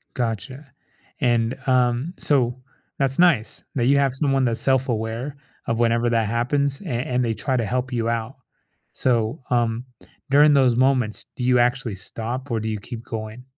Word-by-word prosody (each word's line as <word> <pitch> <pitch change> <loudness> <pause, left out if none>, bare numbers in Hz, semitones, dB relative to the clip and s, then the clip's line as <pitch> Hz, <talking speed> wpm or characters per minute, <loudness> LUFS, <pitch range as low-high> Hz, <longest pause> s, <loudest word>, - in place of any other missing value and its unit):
Gotcha. 130 - -4 0.5
And, 120 -2 +1
um, 125 +5 +1
so, 125 -4 +1 0.4
that's 135 -1 0
nice 170 -11 +3
that 120 -2 +1
you 140 +2 +5
have 140 -2 +2
someone 135 0 +1
that's 115 -2 0
self 130 0 +2
aware 115 +5 -3 0.3
of 115 - -1
whenever 120 0 +2
that 115 -2 +2
happens 135 - 0
a - - -10
and 125 +1 0
they 115 - 0
try 130 +3 -1
to 115 - 0
help 125 +4 -2
you 115 -1 0
out. 115 +2 -3 0.6
So, 120 +1 0
um, 120 -1 +1 0.5
during 145 +2 +6
those 130 -4 +4
moments, 130 -4 +1
do 125 - -3
you 125 0 +4
actually 120 -2 +1
stop 115 +8 -4
or 115 -1 0
do 110 - -3
you 110 -1 -2
keep 115 +3 -8
going? 110 +2 -7
125 Hz, 170 wpm, -23 LUFS, 115-135 Hz, 0.6 s, during